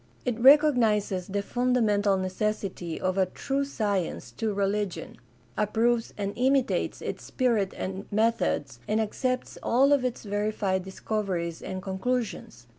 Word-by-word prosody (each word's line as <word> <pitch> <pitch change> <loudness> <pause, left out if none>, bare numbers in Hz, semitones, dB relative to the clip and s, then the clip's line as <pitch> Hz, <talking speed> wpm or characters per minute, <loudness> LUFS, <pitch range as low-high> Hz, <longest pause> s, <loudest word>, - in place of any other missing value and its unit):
It 245 -2 -1
recognizes 230 - +4
the 200 +1 -2
fundamental 215 -5 +2
necessity 185 -2 -2
of 185 +1 0
a 190 - +3
true 275 +8 -2
science 205 - -2
to 215 - -2
religion, 200 -1 -2 0.4
approves 225 +2 +1
and 200 -1 -2
imitates 265 +1 +1
its - - -4
spirit 230 -7 +1
and 190 +1 -5
methods, 215 - 0
and 215 +1 +1
accepts 255 +4 -2
all 275 +4 +4
of 280 -3 +2
its 250 -2 -2
verified 205 -2 -1
discoveries 190 -4 -3
and 185 -1 -5
conclusions. 195 - -3
210 Hz, 125 wpm, -27 LUFS, 190-240 Hz, 0.4 s, recognizes